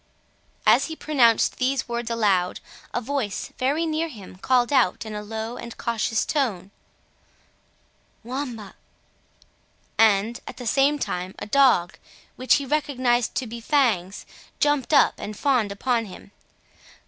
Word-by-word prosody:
As -, -, +5 dB
he 320 Hz, -, -6 dB
pronounced 250 Hz, -8 st, +2 dB
these 265 Hz, +1 st, 0 dB
words 235 Hz, -1 st, -3 dB
aloud, 200 Hz, -6 st, +1 dB, 0.3 s
a -, -, -1 dB
voice 245 Hz, -5 st, -3 dB
very 285 Hz, +6 st, +1 dB
near 320 Hz, +1 st, -1 dB
him 210 Hz, -, -11 dB
called 245 Hz, +6 st, +1 dB
out 235 Hz, -5 st, +2 dB
in 220 Hz, -, -7 dB
a 210 Hz, -, -4 dB
low 220 Hz, +3 st, -5 dB
and 235 Hz, -1 st, -9 dB
cautious 225 Hz, -1 st, -1 dB
tone, 205 Hz, -, -1 dB, 1.5 s
"Wamba!" 240 Hz, -4 st, -6 dB, 1.3 s
and, 220 Hz, +1 st, +3 dB
at -, -, -8 dB
the 245 Hz, -, -8 dB
same 275 Hz, +5 st, +3 dB
time, 185 Hz, -8 st, -4 dB
a -, -, -6 dB
dog, 240 Hz, -8 st, +3 dB, 0.4 s
which 255 Hz, +1 st, +3 dB
he 280 Hz, -, -1 dB
recognised 255 Hz, -5 st, 0 dB
to 260 Hz, -, -1 dB
be 235 Hz, 0 st, -8 dB
Fangs, 225 Hz, -, +1 dB, 0.3 s
jumped 290 Hz, -2 st, +1 dB
up 295 Hz, -, +5 dB
and 210 Hz, 0 st, -6 dB
fawned 250 Hz, -8 st, +1 dB
upon 230 Hz, +3 st, -1 dB
him. 195 Hz, 0 st, -12 dB
240 Hz, 135 wpm, -24 LUFS, 210-275 Hz, 1.5 s, As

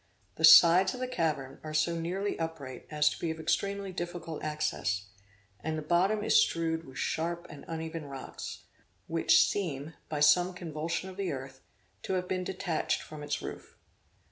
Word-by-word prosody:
The -, -, -7 dB
sides 180 Hz, +4 st, +8 dB
of -, -, -8 dB
the 255 Hz, -, -2 dB
cavern 155 Hz, -, -2 dB
are 155 Hz, 0 st, -5 dB
so 160 Hz, +2 st, +2 dB
nearly 185 Hz, +5 st, -2 dB
upright 150 Hz, -6 st, -5 dB
as 150 Hz, -1 st, +2 dB
to -, -, -7 dB
be 170 Hz, -, -2 dB
of 160 Hz, 0 st, -4 dB
extremely 195 Hz, +4 st, -1 dB
difficult 175 Hz, -2 st, -5 dB
access; 150 Hz, -10 st, -1 dB, 0.5 s
and 155 Hz, +6 st, -3 dB
the 155 Hz, -, -4 dB
bottom 185 Hz, +7 st, +2 dB
is -, -, +5 dB
strewed 165 Hz, 0 st, 0 dB
with 130 Hz, -1 st, -11 dB
sharp 170 Hz, +1 st, -2 dB
and 145 Hz, -, -10 dB
uneven 160 Hz, -1 st, -5 dB
rocks, 135 Hz, -1 st, -7 dB, 0.4 s
which 165 Hz, 0 st, +4 dB
seem, 160 Hz, -6 st, -3 dB, 0.2 s
by 150 Hz, -, -2 dB
some 175 Hz, +5 st, +5 dB
convulsion 165 Hz, +1 st, -3 dB
of 185 Hz, -, -13 dB
the 195 Hz, -3 st, -1 dB
earth, 135 Hz, 0 st, -7 dB, 0.4 s
to 190 Hz, -, -3 dB
have 180 Hz, -1 st, -1 dB
been 185 Hz, 0 st, -1 dB
detached 180 Hz, -3 st, -1 dB
from 155 Hz, -1 st, -9 dB
its 145 Hz, 0 st, -3 dB
roof. -, -, -8 dB
165 Hz, 170 wpm, -30 LUFS, 150-180 Hz, 0.5 s, sides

